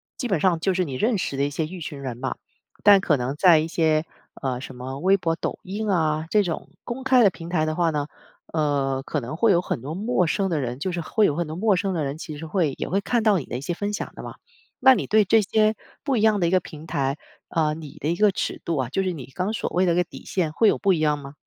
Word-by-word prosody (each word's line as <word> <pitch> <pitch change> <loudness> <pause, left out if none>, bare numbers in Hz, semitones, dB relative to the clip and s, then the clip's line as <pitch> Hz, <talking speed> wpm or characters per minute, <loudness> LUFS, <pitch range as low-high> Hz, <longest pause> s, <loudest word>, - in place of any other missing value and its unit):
基 245 -4 -4
本 190 -6 +1
上 170 -2 +2
就 190 0 +1
是 185 0 0
你 140 - -6
认 220 - +1
识 145 - -3
的 140 - 0
一 145 - +1
些 155 +2 -2
一 180 0 -9
群 145 -2 -6
人 130 -3 -4
嘛。 - - -3 0.5
但 200 -2 +7
可 150 -6 +2
能 125 +3 -2
在 170 0 +6
一 155 +1 0
些， 160 -1 +1 0.3
呃， 130 -2 -2
什 130 - -8
么 130 +2 -6
微 190 +4 +4
博 165 -3 -1
抖 - - -4
音 205 +3 -4
啊， 160 -3 +1
这 210 -1 +3
种 170 -3 -4
公 250 +2 -5
开 260 -2 +5
的 200 - +7
平 170 -1 -9
台 155 -3 +1
的 155 - -1
话 170 -1 +2
呢， 145 -2 -1 0.5
呃， 140 -4 0
可 150 - -3
能 130 +3 -6
会 210 +5 +3
有 175 -1 +4
很 120 - -3
多 150 +5 -5
陌 205 -4 +1
生 195 +5 0
的 155 - +1
人， 125 -1 -3
就 185 +6 -3
是 175 -1 -3
会 210 +6 +2
有 145 - +1
很 170 0 -2
多 155 - -6
陌 205 +2 +2
生 190 0 -1
的 155 - -1
人， 140 +3 -4
其 155 -4 -7
实 160 - -7
会 160 -5 0
也 - - -3
会 195 +2 0
看 235 +1 0
到 205 -5 +4
你 - - -7
的 120 - -4
一 - - -6
些 175 +5 -2
分 205 +3 -3
享 - - -4
的 - - -9
嘛。 - - -8 0.4
那 265 -1 +7
你 205 - -2
对 215 0 +4
这 220 +3 +4
些 215 +2 +2 0.3
不 275 -4 0
一 - - +1
样 215 -2 +4
的 175 - +2
一 170 - 0
个 185 - +4
平 160 -2 -11
台， 140 -2 -1 0.3
呃， 155 -2 +1
你 155 -3 -9
的 150 - -2
一 - - 0
个 210 0 +4
尺 - - -3
度 165 -3 -1
啊， 130 -2 -1
就 195 - 0
是 185 -1 -1
你 145 -7 -7
刚 185 +4 -1
所 - - -3
谓 180 +1 +2
的 170 - +3
一 - - 0
个 180 - +3
底 175 - -12
线 165 -5 -1
会 220 +6 +4
有 - - +1
不 195 -1 +3
一 160 - 0
样 150 -1 +2
吗？ 140 0 -10
170 Hz, 315 characters per minute, -24 LUFS, 150-195 Hz, 0.5 s, 但